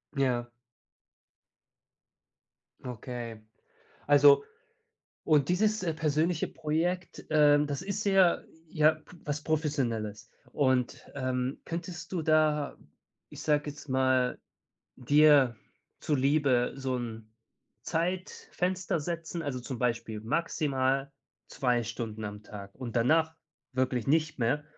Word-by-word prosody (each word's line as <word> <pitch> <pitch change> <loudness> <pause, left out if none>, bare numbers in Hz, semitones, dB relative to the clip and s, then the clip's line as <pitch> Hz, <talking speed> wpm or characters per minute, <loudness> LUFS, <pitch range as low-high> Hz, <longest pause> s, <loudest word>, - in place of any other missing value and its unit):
Ja. 125 -3 0 2.4
Okay, 120 -2 -6 0.7
also 145 0 +6 0.8
und 150 -3 +3
dieses, 210 +4 +2
äh, 170 -3 0
persönliche 160 +1 0
Projekt, 175 +4 -2
ähm, 150 -1 +5
das 145 +2 -3
ist 200 +2 -3
ja 195 -3 +4 0.3
ja, 155 -1 +4
p 155 +3 -17
was 145 0 -3
Professionelles. 120 -9 -2 0.2
Und, 130 -3 +1
ähm, 130 -1 -2
könntest 170 0 -6
du 175 -3 -1
da, 155 -2 +2 0.5
ich - - -10
sage 150 -1 +1
jetzt 145 +1 -12
mal, 130 -1 +2 0.6
dir 145 -1 +5 0.4
zuliebe 140 -3 +2
so 135 -1 -2
'n 115 -2 -6 0.5
Zeitfenster 180 +1 -2
setzen, 170 +2 -4
also 140 -4 -3
zum 125 +1 -6
Beispiel 115 -3 -2
maximal 135 0 0 0.4
2 125 -3 0
Stunden 110 -1 -5
am 105 0 -7
Tag 100 -2 -10
und 125 -3 -7
danach 160 +7 +3 0.4
wirklich 125 -2 0
nicht 155 +1 +2
mehr 125 +6 +1
145 Hz, 105 wpm, -29 LUFS, 125-160 Hz, 2.4 s, also